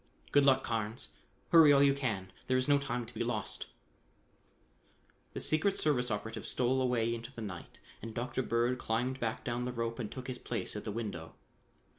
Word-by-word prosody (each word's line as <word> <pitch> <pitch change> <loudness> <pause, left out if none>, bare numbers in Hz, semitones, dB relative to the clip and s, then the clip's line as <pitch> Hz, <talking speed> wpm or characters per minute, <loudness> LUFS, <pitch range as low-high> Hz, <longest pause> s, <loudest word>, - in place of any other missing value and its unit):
Good 145 -1 +5
luck. 135 -1 +5
Carnes: 115 +1 -2 0.4
hurry 160 -3 +8
all 140 0 +6
you 140 -1 +6
can. 110 -9 -2 0.2
There 130 - +3
is 130 - 0
no 145 -1 +5
time 125 -4 -2
to 115 - -13
be 115 +1 -1
lost." 115 -4 -3 1.7
The - - -4
secret 175 +6 +2
service 130 -8 +1
operative 110 +1 -3
stole 130 +1 +2
away 120 -2 +1
into 115 +2 -6
the 115 -4 -7
night 90 -4 -7 0.2
and 115 - -6
Dr. 125 +2 -1
Bird 120 +1 +1
climbed 125 +4 -1
back 115 -2 -2
down 120 0 -1
the 125 - -2
rope 115 -1 -3
and 110 -4 -4
took 130 -1 -7
his 125 -1 -3
place 115 - -4
at 105 - -5
the 105 - -2
window. 100 -7 -5
120 Hz, 190 wpm, -33 LUFS, 115-130 Hz, 1.7 s, hurry